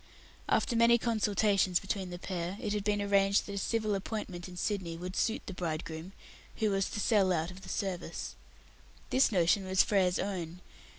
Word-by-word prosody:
After 240 - +2
many 235 +1 +6
consultations 210 -5 +2
between 195 -1 -3
the 175 - -6
pair, 180 +1 -4
it 215 -4 -2
had 210 -1 -1
been 205 0 +1
arranged 200 0 +3
that 200 - -6
a - - -4
civil 215 +1 0
appointment 195 -3 -4
in 180 - -10
Sydney 180 -5 -2
would 180 +2 -5
best - - +1
suit 225 - -2
the 195 - -6
bridegroom, 165 0 -4 0.4
who 215 -2 +1
was 195 0 +1
to 210 - -4
sell 200 -3 +3
out 165 0 0
of 185 +1 -12
the - - -10
service. 180 -4 -3 0.8
This 260 -1 +4
notion 185 +1 +3
was 190 0 +4
Frere's 185 -3 +2
own. 180 -3 -4
195 Hz, 185 wpm, -31 LUFS, 180-210 Hz, 0.8 s, many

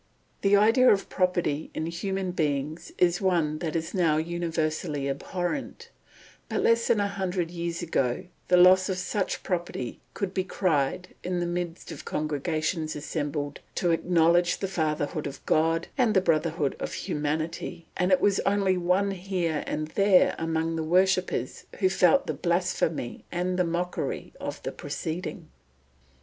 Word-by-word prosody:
The 200 0 +4
idea 225 +5 +5
of 195 - +1
property 175 -5 0
in 155 - -2
human 190 +2 -2
beings 155 0 -2
is 175 +1 +3
one 165 -5 +1
that 165 -1 -3
is 160 -1 -2
now 165 -5 +3
universally 160 -3 -1
abhorrent; 175 - -4 0.6
but - - -1
less 230 0 +3
than 215 - +3
a 205 - +2
hundred 185 -3 -2
years 170 0 -3
ago 130 -6 0 0.2
the 180 - +5
loss 185 +2 +6
of 185 - -1
such 190 +1 -2
property 175 -9 -3 0.2
could 195 -2 -2
be 190 - 0
cried 180 -1 0
in 180 0 -1
the 175 - 0
midst 175 0 -4
of - - -8
congregations 155 +2 -2
assembled 145 -1 -3 0.2
to 175 - +1
acknowledge 170 +1 +3
the 195 - -2
Fatherhood 155 -4 -1
of 140 -1 -9
God 165 +1 +2
and 230 -4 +3
the - - +7
brotherhood 160 -3 +1
of - - -4
humanity, 160 +3 -3
and 180 +1 +1
it 185 - +5
was 200 -1 +3
only 195 -2 +2
one 180 +3 +2
here 180 -5 -2
and 155 0 -2
there 195 +1 +4
among 165 0 -1
the 160 - -1
worshippers 185 +3 +1
who 190 -2 +4
felt 190 +8 +4
the - - -2
blasphemy 170 -6 -1
and 180 +1 -1
the - - +4
mockery 175 +1 -3
of - - -5
the - - -3
proceeding. 165 0 -5
175 Hz, 155 wpm, -27 LUFS, 155-185 Hz, 0.6 s, the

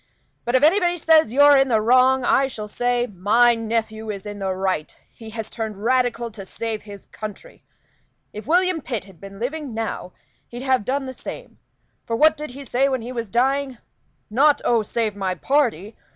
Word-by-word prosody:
But 240 - 0
if 260 - +3
anybody 350 +2 +3
says 315 -6 +4
you're 285 +3 +6
in 270 0 +4
the 225 -4 +2
wrong, 255 +3 +4
I 270 +2 +3
shall 215 -5 -6
say, 245 +2 0
'My 220 +4 +3
nephew 220 -1 -3
is 200 -2 -5
in 205 0 -7
the 190 -1 -2
right; 185 -4 -2 0.2
he 225 -1 -11
has 220 0 -6
turned 215 -3 -5
Radical 245 -1 +1
to 205 -2 -9
save 220 +2 -5
his 205 -1 -11
country. 210 -2 -10 0.7
If 210 - -8
William 360 0 +2
Pitt 240 -6 -4
had 190 -4 -18
been 195 0 -10
living 265 +2 -4
now 220 -5 -4 0.3
he'd 240 +2 -8
have 260 -5 +1
done 270 +2 -1
the 260 - -6
same; - - -9 0.4
for 230 - -3
what 310 +5 +5
did 300 0 -6
he 275 +3 -10
say 270 +3 +1
when 260 -4 -2
he 245 - -6
was 235 -3 -4
dying? 265 +4 0 0.5
Not 280 +7 +3
'Oh, 235 -2 +3
save 215 -1 -2
my 190 -2 -2
party!' 230 - 0
235 Hz, 190 wpm, -22 LUFS, 215-270 Hz, 0.7 s, you're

